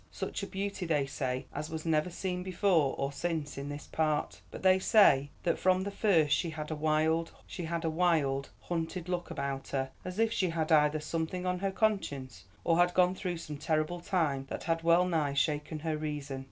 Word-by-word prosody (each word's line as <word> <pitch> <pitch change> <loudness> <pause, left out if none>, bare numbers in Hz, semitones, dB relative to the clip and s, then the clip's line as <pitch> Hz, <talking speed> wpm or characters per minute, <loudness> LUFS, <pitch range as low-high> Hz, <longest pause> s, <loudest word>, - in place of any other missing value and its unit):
Such - - -4
a 200 - -4
beauty, 195 -2 -3
they 150 -4 +2
say, 130 -1 -3
as 150 +2 -4
was 160 0 -5
never 160 +1 +2
seen 180 +1 -3
before 180 -5 +2
or 140 0 -1
since 160 -1 -3
in 140 +1 -5
this 145 0 -6
part. 155 -2 -1
But - - -9
they 185 0 +5
say 145 - +5
that 170 - +1
from 185 0 +3
the 200 - -3
first 165 -9 +3
she 170 - -1
had 155 -1 -6
a 155 - -3
wild, 155 +2 +1 1.3
hunted 170 +1 -3
look 180 -1 -2
about 135 -1 -3
her, 135 -1 -2
as 185 +1 -6
if 225 0 +2
she 185 -5 +1
had 165 -1 -1
either 150 0 +4
something 165 +3 -3
on 180 0 0
her 195 +1 0
conscience, 190 - -1 0.2
or 165 0 +3
had 175 0 +3
gone 180 0 +4
through 180 -2 -3
some 150 -3 -7
terrible 155 +3 0
time 155 -7 0
that - - -5
had 165 -1 0
well 170 +2 +4
nigh 155 -6 0
shaken 150 +2 0
her 160 -1 -1
reason. 150 -3 -4
160 Hz, 195 wpm, -31 LUFS, 150-180 Hz, 1.3 s, they